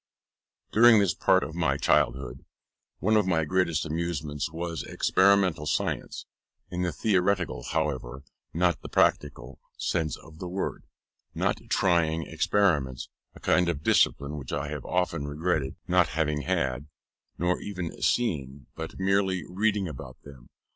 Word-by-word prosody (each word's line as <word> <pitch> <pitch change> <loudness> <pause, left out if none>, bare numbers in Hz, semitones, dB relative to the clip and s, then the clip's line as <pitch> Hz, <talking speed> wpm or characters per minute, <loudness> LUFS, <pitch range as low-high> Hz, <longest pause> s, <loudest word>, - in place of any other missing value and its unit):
During 115 +1 +7
this 100 -3 +2
part - - +3
of - - -6
my - - 0
childhood, 60 0 +1 0.5
one 110 +3 +1
of 105 -3 +3
my 80 -3 +2
greatest 85 -2 +1
amusements 80 -1 -3
was 85 0 -4
experimental 95 -5 +2
science; - - -2 0.5
in 90 - -3
the 90 -1 0
theoretical, 95 - 0
however, 65 -4 -3 0.3
not 85 +1 +1
the - - -8
practical 75 -1 0 0.2
sense 80 -2 -1
of 80 0 -15
the 90 - -5
word; 95 +2 -4 0.5
not - - 0
trying 80 -3 +2
experiments 75 -11 0 0.3
a - - -12
kind 90 -1 +2
of 75 -4 -3
discipline 70 +1 +2
which 65 - -8
I 70 +1 -2
have 75 -3 -6
often 90 -5 -1
regretted 75 -2 -1
not 90 -2 +4
having 75 0 -1
had 65 +1 -1 0.5
nor 90 +1 0
even 90 -5 -6
seeing, 70 - 0
but 80 0 -7
merely 95 -2 +1
reading 100 +1 0
about 65 -4 -9
them. 65 -4 -14
80 Hz, 140 wpm, -27 LUFS, 75-90 Hz, 0.5 s, During